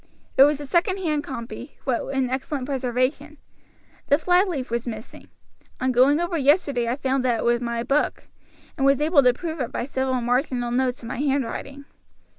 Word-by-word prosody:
It 270 - +8
was 295 0 +1
a 290 - -6
second 360 - +1
hand 305 -6 -1
copy, 235 -1 -8
but 255 -3 0
in 265 -1 0
excellent 265 0 -3
preservation. 265 +3 -2 0.7
The 285 - +4
flyleaf 355 - +1
was 235 +1 -2
missing. 220 -1 -8 0.5
On 260 0 +1
going 260 +5 +4
over 345 -1 -1
yesterday 280 -4 +2
I 240 - 0
found 265 -1 -1
that 240 -3 +1
it - - -3
was 240 0 +2
my 235 -1 -2
book, 275 +4 0 0.5
and 270 - -1
was 275 -1 +4
able 300 0 +4
to 250 -2 +5
prove 320 +5 -6
it 250 - -3
by - - -3
several 260 -1 -1
marginal 245 0 0
notes 250 0 0
in - - -7
my - - -5
handwriting. 275 0 -2
265 Hz, 185 wpm, -24 LUFS, 245-290 Hz, 0.7 s, It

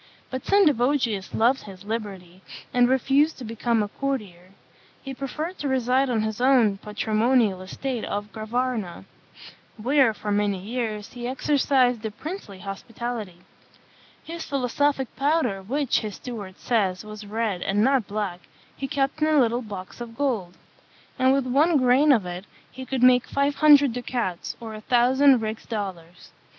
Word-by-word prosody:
But 260 0 -4
Sendivogius 265 - +2
loved 245 +4 +2
his 195 -1 -11
liberty, 195 -5 -6 0.3
and 245 0 +4
refused 275 +4 +2
to 260 - -8
become 230 0 0
a - - -3
courtier. 205 -9 -4 0.5
He 270 - -6
preferred 300 +7 -5
to 290 - -2
reside 260 0 +1
on 225 -3 +1
his 220 +1 -3
own 245 -7 +4
patrimonial 215 -1 +1
estate 240 +5 -4
of 205 +1 -4
Gravarna, 220 -4 -3 0.7
where, 260 +2 +3
for 210 - -4
many 205 -1 +1
years, 215 +1 -4
he 240 -1 -5
exercised 255 -3 +2
a 220 - -2
princely 260 - -8
hospitality. 210 -1 -6 0.8
His 335 0 -6
philosophic 275 0 -1
powder, 275 -8 +1
which, 265 +7 0
his 215 -3 -5
steward 205 -7 -8
says, 200 -5 0
was 215 0 -9
red, 210 -3 -2
and 200 +3 +1
not 265 -3 +2
black, 200 -4 -3 0.4
he 270 - -4
kept 275 +1 -1
in 305 - +3
a 310 -1 +3
little 240 -1 +2
box 200 -1 -8
of 230 -1 -8
gold; 220 -11 -1 0.6
and 260 0 +4
with 270 -1 +2
one 295 +6 +3
grain 260 +3 +4
of 225 -8 +3
it 180 +2 -6 0.3
he 260 0 -9
could 260 -2 -1
make 250 -1 +5
five 280 +1 +1
hundred 290 -4 +6
ducats, 240 -7 -3
or 225 -2 -7
a 215 - -8
thousand 255 +2 +4
rix 220 0 -5
dollars. 185 -6 -6
240 Hz, 155 wpm, -24 LUFS, 210-270 Hz, 0.8 s, hundred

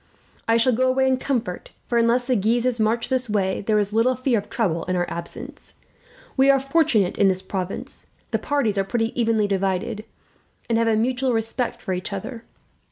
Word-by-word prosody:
"I 230 0 +4
shall 245 +2 +3
go 255 +3 +2
away 265 +1 +2
in 260 -1 +2
comfort 240 -9 -3 0.2
for, 235 - +1
unless 235 +2 +2
the 255 0 +1
Guises 235 +3 +1
march 225 +2 +1
this 255 -2 0
way, 195 -3 0
there 215 +1 +1
is 205 0 0
little 235 +3 +3
fear 255 -2 +1
of 205 - -11
trouble 175 -9 0
in 185 - -1
our 175 -1 0
absence. 240 - -8 0.6
We 270 0 +4
are 275 0 +6
fortunate 275 - +1
in 200 - +5
this 190 0 0
province. 190 -1 -5 0.2
The - - +1
parties 245 -9 0
are - - +2
pretty 225 +3 -1
evenly 225 -3 +1
divided, 195 +1 -1 0.6
and 230 -1 +1
have 230 - +2
a 225 - +3
mutual 250 +3 +1
respect 225 +2 -2
for 190 - -2
each 185 +3 -4
other. 230 +4 -6
230 Hz, 195 wpm, -23 LUFS, 200-255 Hz, 0.6 s, are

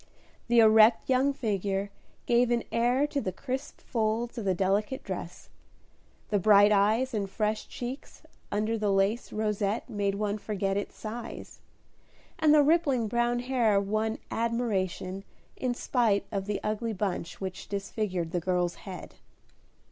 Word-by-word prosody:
The 240 0 +2
erect 220 +1 +6
young 260 +2 +3
figure 200 -6 -2 0.3
gave 240 0 +3
an 240 -1 +1
air 245 +4 +2
to 290 -1 -2
the 185 - -2
crisp 260 +7 -5
folds 230 0 -1
of 215 - -5
the 190 -1 +2
delicate 205 - 0
dress; - - -7 0.8
the 205 - +3
bright 205 +1 +6
eyes 215 +6 +3
and 200 -3 -2
fresh 215 +1 -1
cheeks 250 +3 -7 0.3
under 215 +2 0
the 210 -1 +1
lace 195 +4 +1
rosette 210 0 -1
made 205 -4 -1
one 210 0 -2
forget 195 -2 -2
its 205 - -3
size; 230 +2 -7 0.8
and 315 -2 +4
the 300 -1 +7
rippling 285 -7 +2
brown 240 +2 +1
hair 240 -5 +2
won 215 +3 -1
admiration 195 -5 -1 0.3
in 250 -2 -2
spite 225 -6 +1
of 195 -1 -3
the 205 -1 -1
ugly 215 +2 -2
bunch 185 -4 -3
which 190 -1 -6
disfigured 195 -4 -3
the 175 - 0
girl's 180 0 0 0.2
head. 185 - -8
215 Hz, 145 wpm, -28 LUFS, 200-240 Hz, 0.8 s, the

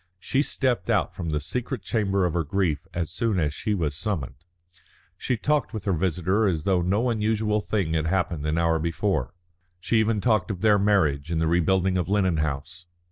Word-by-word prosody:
She 135 +8 0
stepped 130 -5 -1
out 105 -7 +1
from 85 -3 -5
the 75 -1 0
secret 120 - -4
chamber 100 -3 +1
of 85 - -1
her 85 -1 0
grief 80 0 -1
as 85 -2 -3
soon 110 +2 0
as 75 -4 0
she 105 +6 -2
was 80 -6 -1
summoned. 80 - -3 0.8
She 125 - -2
talked 150 +1 0
with 105 - -4
her 100 - +1
visitor 95 +4 +1
as 80 -5 -1
though 95 -1 +2
no 105 +8 +1
unusual 110 -1 0
thing 95 -7 -1
had 80 -1 0
happened 85 -4 -1
an 75 +1 0
hour 85 -1 +2
before, 85 +4 -1 0.4
she 110 +6 +1
even 110 -1 +1
talked 110 -4 +1
of 95 -4 -4
their 105 -2 +4
marriage 85 -8 +2
and 85 -1 0
the 80 - +1
rebuilding 90 +3 +2
of 90 - -2
Lennon 95 -4 +2
House. 75 +3 -4
95 Hz, 195 wpm, -25 LUFS, 80-105 Hz, 0.8 s, their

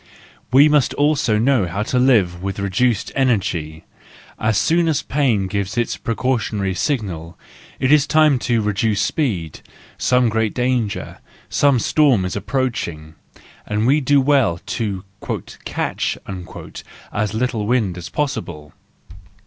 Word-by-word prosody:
We 140 +4 +7
must 150 -3 +2
also 145 -7 +2
know 120 -4 +2
how 100 +5 -2
to 125 +3 0
live 100 -9 +3
with 95 0 -4
reduced 100 +4 0
energy: 85 - -1 0.5
as 110 -1 +1
soon 170 +6 +2
as 155 -3 0
pain 130 -9 +1
gives 100 +2 -3
its 120 - 0
precautionary 115 -5 -1
signal, 95 - -3 0.4
it 130 - +1
is 150 -1 +5
time 155 -3 +4
to 115 -2 +2
reduce 105 0 0
the - - +2
speed—some 120 - -1
great 110 -1 -1
danger, 125 -4 -1 0.3
some 140 -2 +3
storm, 125 -5 +3
is 90 - -3
approaching, 100 - -3 0.5
and 105 +1 0
we 145 +5 +3
do 145 +1 +3
well 135 -10 +2 0.2
to 100 -4 -2 0.6
"catch" - - -2 1.0
as 105 -1 -1
little 115 -3 -1
wind 110 -7 +1
as 90 -2 -7
possible. 75 - -4
115 Hz, 130 wpm, -20 LUFS, 100-135 Hz, 1.0 s, We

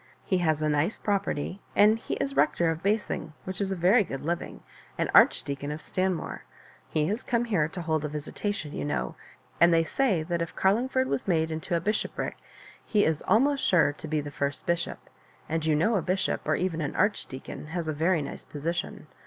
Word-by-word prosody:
He 185 - +1
has 155 -3 +1
a - - +2
nice 150 +7 +1
property, 195 -3 -2
and 215 +2 +5
he - - -4
Ls 275 0 -1
Hector 170 -10 +3
of 160 0 -5
Basing, 200 -6 -1
which 185 +1 -4
is 195 -1 -1
a - - 0
very 190 +6 +5
good 135 -6 -6
living, 170 +1 -3 0.3
and - - 0
Arch - - +6
deacon 140 0 -4
of 150 - -4
Stanmore. 185 +1 -2 0.5
He 155 -1 +1
has 210 +8 -2
come 240 -1 0
here 185 -10 +1
to 175 +2 -6
hold 160 -2 0
a - - -1
visitation, 150 +2 -4
you - - -3
know; 145 - -2 0.5
and 170 0 +7
they 165 -1 +4
say 195 -3 +1
that 170 +1 -2
if 170 - -4
Cariingford 250 +7 +2
was 255 - -2
made 160 -3 +2
into 160 +3 -2
a - - +2
bishopric, 210 +5 -2 0.5
he 210 -2 +2
is 160 -2 +1
al 215 +4 +6
most 280 0 +1
sure 165 -6 +4
to 155 - -9
be 155 0 0
the 145 0 -7
first 140 0 -3
bishop; 170 0 -2 0.4
and 160 0 -1
you 155 - +4
know 175 +10 +2
a 195 - +2
bishop^ 185 +3 0
or - - +2
even 175 -3 -1
an 145 - -3
archdeacon, 185 -8 -2
has 165 +1 -3
a 155 - 0
very 160 +1 +2
nice 140 - -6
position. 165 +4 -4
170 Hz, 210 wpm, -28 LUFS, 155-200 Hz, 0.5 s, and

